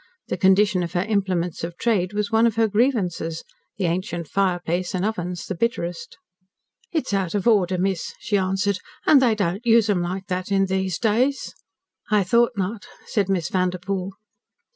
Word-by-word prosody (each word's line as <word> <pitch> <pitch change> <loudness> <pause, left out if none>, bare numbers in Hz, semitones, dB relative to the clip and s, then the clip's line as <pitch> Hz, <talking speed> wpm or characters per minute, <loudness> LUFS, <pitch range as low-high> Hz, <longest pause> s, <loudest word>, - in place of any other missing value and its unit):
The - - -1
condition 190 -1 +4
of 175 0 -4
her 175 -1 +1
implements 190 -6 -1
of 170 +1 -5
trade 200 -6 +1
was 210 +1 -2
one 225 +1 +4
of 225 - -1
her 225 0 +3
grievances 200 -8 0 0.3
the 195 - -1
ancient 175 -1 -2
fireplace 180 0 -1
and 185 +1 0
ovens 180 -5 -3
the - - -3
bitterest. 175 -4 -3 0.7
"It's 315 - -2
out 195 -2 0
of 205 +2 0
order, 190 -5 +3
miss," 190 -1 -2
she 210 - -2
answered. 195 0 0 0.3
"And 285 -3 +6
they 235 -4 +3
don't 195 +1 -1
use 230 -3 +4
'em 180 -3 +1
like 185 +2 -3
this 185 -1 -3
in 195 -1 +3
these 190 -2 -1
days." 245 +5 0 0.6
"I 210 -2 +3
thought 235 +6 +3
not," 200 +3 -3 0.2
said 200 -3 0
Miss 180 -3 0
Vanderpoel. 185 +1 -2
195 Hz, 170 wpm, -23 LUFS, 180-215 Hz, 0.7 s, And